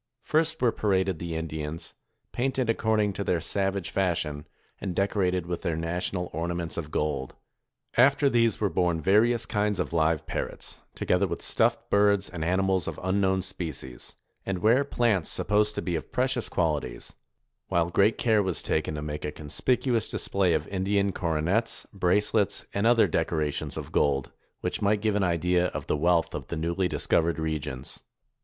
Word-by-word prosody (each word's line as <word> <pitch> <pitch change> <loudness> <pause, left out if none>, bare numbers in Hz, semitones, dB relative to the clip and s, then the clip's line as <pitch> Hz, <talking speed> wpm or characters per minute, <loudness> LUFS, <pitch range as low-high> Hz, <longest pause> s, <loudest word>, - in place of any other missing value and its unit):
First, 160 +1 +1
were 120 - +5
paraded 95 -5 0
the 85 -1 -4
Indians, 80 0 -5 0.4
painted 130 -2 0
according 110 -2 +1
to 100 - -3
their 90 -3 +1
savage 95 +1 -2
fashion, 80 -6 -1 0.3
and 90 -3 -4
decorated 95 -3 +1
with 85 0 -4
their 85 - -1
national 90 +2 -2
ornaments 85 +1 -3
of 80 -3 -4
gold. 75 -4 -2 0.6
After 140 +3 +5
these 115 -4 +2
were 105 -2 0
borne 90 -2 +1
various 110 +7 +3
kinds 105 -1 0
of - - -2
live 80 -1 +2
par - - -2
rots, - - -10 0.2
together 90 +2 +1
with - - -5
stuffed - - +1
birds 100 -1 +3
and 85 -3 -4
animals 95 +1 +1
of 80 - -4
unknown 95 0 +1
species, 80 -9 -6 0.3
and 95 -2 -3
rare 120 +6 +5
plants 115 - +1
supposed 105 +1 +1
to - - -3
be 90 - -1
of - - -5
precious 130 -1 0
quali 80 -5 0
ties; - - -10 0.5
while 85 0 +1
great 100 +5 +3
care 110 -3 +3
was 95 -4 -2
taken 75 0 -1
to 75 - -4
make 75 0 -5
a 75 - -2
conspicuous 115 - 0
display 95 -4 +1
of 80 0 -2
Indian 100 +1 +1
coronets, 90 +7 -1
bracelets, 100 +2 +1
and 100 +3 +1
other 115 -3 +5
deco 80 -1 0
rations 75 -2 -2
of - - -6
gold, 70 -2 +1 0.3
which - - -2
might 105 +1 +2
give 110 -1 +1
an 105 - +1
idea 90 0 +2
of - - -5
the - - 0
wealth 85 +2 +2
of - - -5
the 85 - -4
newly 85 +4 0
discovered 80 +1 +1
regions. 75 -5 -4
90 Hz, 170 wpm, -27 LUFS, 80-105 Hz, 0.6 s, were